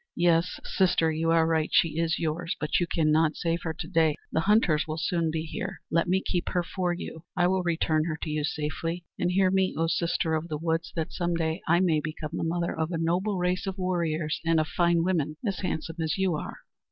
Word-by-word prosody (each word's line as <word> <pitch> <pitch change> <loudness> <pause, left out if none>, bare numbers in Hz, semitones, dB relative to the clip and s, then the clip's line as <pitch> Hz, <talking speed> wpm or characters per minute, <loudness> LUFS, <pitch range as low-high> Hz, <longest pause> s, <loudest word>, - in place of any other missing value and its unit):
"Yes, 170 0 +2
sister, 175 -4 +2
you 160 +1 0
are 165 -1 +4
right; 160 -1 +1
she 165 -1 +3
is 165 -1 +1
yours; 165 +1 -2
but 150 -1 +1
you 175 - 0
cannot 155 0 +2
save 170 0 -1
her 160 - -3
to - - -6
day! 160 -2 +3 0.2
The - - +1
hunters 175 -5 +3
will 155 0 -3
soon 170 0 0
be 160 0 -2
here. 160 - -5
Let 165 +2 +2
me 190 +2 +1
keep 175 -1 -1
her 180 -1 0
for 180 +1 -2
you; 170 -2 -6
I 175 - +4
will 185 +1 +2
return 160 -2 +1
her 160 -2 -2
to 160 - -3
you 150 0 -1
safely. 165 +3 -3
And 175 - +1
hear 185 +1 +3
me, 190 0 +1
O 165 - +2
sister 165 0 0
of 160 +1 -1
the 155 -3 -3
woods, 165 +1 -1
that 165 -1 -3
some 175 -1 -1
day 160 +1 -1
I 170 +2 +4
may 165 -4 +3
become 155 0 -5
the - - -2
mother 170 +1 -1
of 160 +1 -2
a 170 - -1
noble 180 +5 0
race 180 +2 0
of 190 0 -3
warriors 170 -4 -1
and 165 0 +3
of 155 - +1
fine 170 -1 +2
women, 155 -4 0
as 195 -4 -1
handsome 165 -2 -3
as 160 +2 -1
you 190 -2 +1
are!" 150 - -4
165 Hz, 230 wpm, -27 LUFS, 160-175 Hz, 0.2 s, are